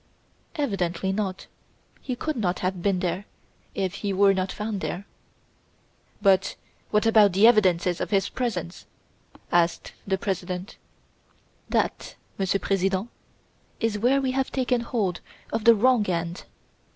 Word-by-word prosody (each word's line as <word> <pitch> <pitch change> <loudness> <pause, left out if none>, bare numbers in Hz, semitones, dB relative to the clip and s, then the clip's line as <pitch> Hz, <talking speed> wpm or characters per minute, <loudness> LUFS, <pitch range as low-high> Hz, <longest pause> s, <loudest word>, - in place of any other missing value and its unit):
"Evidently, 190 - -1
not. 195 -2 -3 0.6
He 255 - -3
could 310 +5 -3
not 185 -6 0
have 185 -1 -2
been 190 -1 +1
there, 185 +2 -2 0.5
if 190 -2 -1
he 200 0 -3
were 195 +1 +5
not 190 0 -1
found 210 -2 -4
there." 190 +3 -4 1.2
"But, 195 -1 +3 0.3
what 210 +1 +2
about 215 -4 +5
the 195 +4 +5
evidences 185 -6 +4
of - - -2
his 195 -2 +2
presence?" 190 -9 -4 0.6
asked 170 -1 +1 0.2
the 190 -1 +1
President. 185 -2 -4 0.9
"That, - - -1 0.2
Monsieur 195 0 +1
President, 195 +3 0 0.7
is 225 -2 0
where 255 +5 +3
we 265 -1 0
have 265 0 -1
taken 250 -2 0
hold 210 -7 -2 0.3
of 220 - -1
the 230 -1 +8
wrong 225 -2 +3
end. 170 0 -3
195 Hz, 135 wpm, -25 LUFS, 185-225 Hz, 1.2 s, the